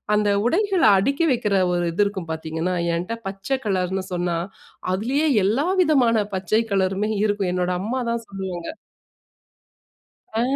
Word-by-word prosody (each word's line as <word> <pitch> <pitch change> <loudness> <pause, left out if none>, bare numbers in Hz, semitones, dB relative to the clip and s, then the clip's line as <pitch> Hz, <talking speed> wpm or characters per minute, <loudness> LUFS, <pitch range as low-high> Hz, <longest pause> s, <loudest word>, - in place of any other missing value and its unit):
அந்த 210 0 +2 0.2
உடைகள 385 - +2
அடுக்கி 275 - +1
வைக்கிற 210 -5 +1 0.2
ஒரு 175 0 0
இது 205 - +3
இருக்கும் 190 -5 -6
பார்த்தீங்கன்னா, 160 +3 -2 0.2
என்ட்ட 180 +7 -3
பச்சை 195 +8 -2
கலர்னு 190 -1 -1
சொன்னா, 175 -1 -1 0.6
அதுலேயே 265 +11 +1 0.2
எல்லா 245 - +1
விதமான 245 - +3
பச்சை 190 +4 +1
கலருமே 195 +2 +1
இருக்கும். 205 -3 0
என்னோட 180 0 0
அம்மா 245 +6 -2
தான் 235 -1 -3
சொல்லுவாங்க 190 -3 -5 1.7
ஆ. 225 - +2
200 Hz, 130 wpm, -23 LUFS, 185-235 Hz, 1.7 s, இது